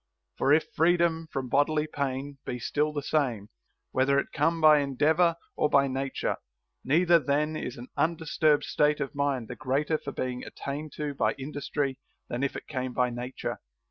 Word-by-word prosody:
For 140 Hz, -, +2 dB
if 155 Hz, +2 st, +3 dB
freedom 165 Hz, -1 st, +2 dB
from 135 Hz, -1 st, -3 dB
bodily 150 Hz, +3 st, +2 dB
pain 140 Hz, -1 st, -3 dB
be 125 Hz, -, -4 dB
still 150 Hz, +6 st, 0 dB
the 145 Hz, -1 st, -4 dB
same, 125 Hz, -10 st, 0 dB, 0.4 s
whether 135 Hz, +2 st, +3 dB
it -, -, -1 dB
come 165 Hz, 0 st, +1 dB
by 155 Hz, -1 st, +7 dB
endeavor 155 Hz, +5 st, +2 dB, 0.2 s
or 150 Hz, -, +2 dB
by 140 Hz, -1 st, +4 dB
nature, 135 Hz, 0 st, -2 dB, 0.5 s
neither 170 Hz, +5 st, +4 dB
then 150 Hz, +1 st, 0 dB
is 125 Hz, -, -5 dB
an 120 Hz, +1 st, -9 dB
undisturbed 160 Hz, -2 st, +2 dB
state 150 Hz, 0 st, +2 dB
of 140 Hz, -2 st, -3 dB
mind 140 Hz, -4 st, -1 dB
the 125 Hz, -, -6 dB
greater 145 Hz, +6 st, 0 dB
for 140 Hz, -, -6 dB
being 125 Hz, -2 st, -3 dB
attained 145 Hz, +2 st, -6 dB
to 150 Hz, -1 st, -3 dB
by -, -, +1 dB
industry 140 Hz, -1 st, -3 dB, 0.3 s
than 120 Hz, -, -3 dB
if 140 Hz, -, -1 dB
it -, -, -6 dB
came 130 Hz, -3 st, -3 dB
by 125 Hz, 0 st, +1 dB
nature. 125 Hz, +2 st, -5 dB
145 Hz, 175 wpm, -28 LUFS, 130-155 Hz, 0.5 s, by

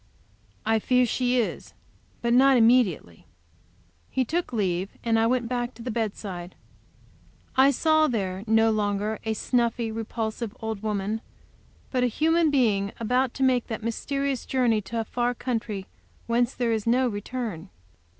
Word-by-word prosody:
"I 225 Hz, 0 st, +3 dB
fear 250 Hz, +3 st, +3 dB
she 250 Hz, +1 st, 0 dB
is. 230 Hz, -, -3 dB, 0.5 s
But 235 Hz, 0 st, +2 dB
not 265 Hz, +1 st, +6 dB
immediately." 225 Hz, -, +2 dB, 0.8 s
He 260 Hz, -, 0 dB
took 335 Hz, +4 st, -2 dB
leave, 190 Hz, -4 st, -1 dB
and 225 Hz, -1 st, +2 dB
I 225 Hz, -, +3 dB
went 245 Hz, -1 st, +1 dB
back 245 Hz, 0 st, -2 dB
to 230 Hz, -, -10 dB
the 245 Hz, -, -3 dB
bedside. 200 Hz, -5 st, -4 dB, 1.0 s
I 265 Hz, +1 st, +6 dB
saw 310 Hz, +3 st, +3 dB
there 195 Hz, -6 st, -2 dB
no 225 Hz, +1 st, +4 dB
longer 210 Hz, 0 st, -1 dB
a 220 Hz, 0 st, -1 dB
snuffy, 235 Hz, -1 st, 0 dB
repulsive 225 Hz, +1 st, -4 dB
old 220 Hz, -3 st, -4 dB
woman, 210 Hz, 0 st, -2 dB, 0.7 s
but 255 Hz, -2 st, +1 dB
a -, -, +4 dB
human 325 Hz, +6 st, +2 dB
being 210 Hz, -8 st, +1 dB
about 250 Hz, +2 st, +1 dB
to 270 Hz, -, -1 dB
make 255 Hz, -2 st, +2 dB
that 220 Hz, -2 st, -5 dB
mysterious 275 Hz, +3 st, -2 dB
journey 240 Hz, -5 st, +2 dB
a 225 Hz, -1 st, -1 dB
far 245 Hz, +2 st, -1 dB
country 225 Hz, -6 st, -3 dB, 0.4 s
whence 235 Hz, +2 st, +1 dB
there 240 Hz, -2 st, 0 dB
is 220 Hz, -1 st, -1 dB
no 250 Hz, +2 st, +3 dB
return. 205 Hz, -4 st, -5 dB
230 Hz, 150 wpm, -26 LUFS, 215-250 Hz, 1.0 s, not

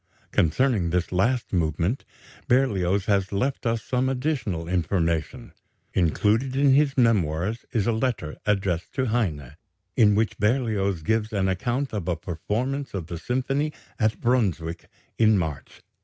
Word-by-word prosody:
Concerning 95 Hz, -, +2 dB
this 90 Hz, +1 st, -1 dB
last 115 Hz, +7 st, 0 dB
movement, 85 Hz, -, 0 dB, 0.4 s
Berlioz 100 Hz, -7 st, +2 dB
has 100 Hz, -2 st, +1 dB
left 125 Hz, +5 st, -1 dB
us 115 Hz, -1 st, 0 dB
some 130 Hz, +1 st, 0 dB
additional 125 Hz, -, -2 dB
information. 85 Hz, -3 st, -1 dB, 0.4 s
Included 105 Hz, -, +1 dB
in 140 Hz, 0 st, +4 dB
his 140 Hz, 0 st, +3 dB
Memoirs 105 Hz, -3 st, +1 dB
is 110 Hz, -4 st, 0 dB
a 120 Hz, -, +2 dB
letter 110 Hz, -9 st, -1 dB
addressed 95 Hz, -4 st, 0 dB
to 130 Hz, -, +1 dB
Heine, 85 Hz, -, -2 dB, 0.4 s
in 105 Hz, -2 st, +5 dB
which 110 Hz, +1 st, 0 dB
Berlioz 105 Hz, -, +1 dB
gives 110 Hz, +3 st, 0 dB
an 100 Hz, -3 st, 0 dB
account 120 Hz, +8 st, -1 dB
of 100 Hz, -6 st, -3 dB
a 90 Hz, -, +1 dB
performance 110 Hz, -, -3 dB
of 90 Hz, -4 st, -3 dB
the 85 Hz, 0 st, -6 dB
symphony 135 Hz, -, -1 dB, 0.3 s
at 110 Hz, 0 st, +1 dB
Brunswick 95 Hz, -9 st, 0 dB, 0.3 s
in 110 Hz, -2 st, +5 dB
March, 80 Hz, -6 st, -5 dB
1843. -, -, -50 dB
105 Hz, 140 wpm, -25 LUFS, 90-125 Hz, 0.4 s, in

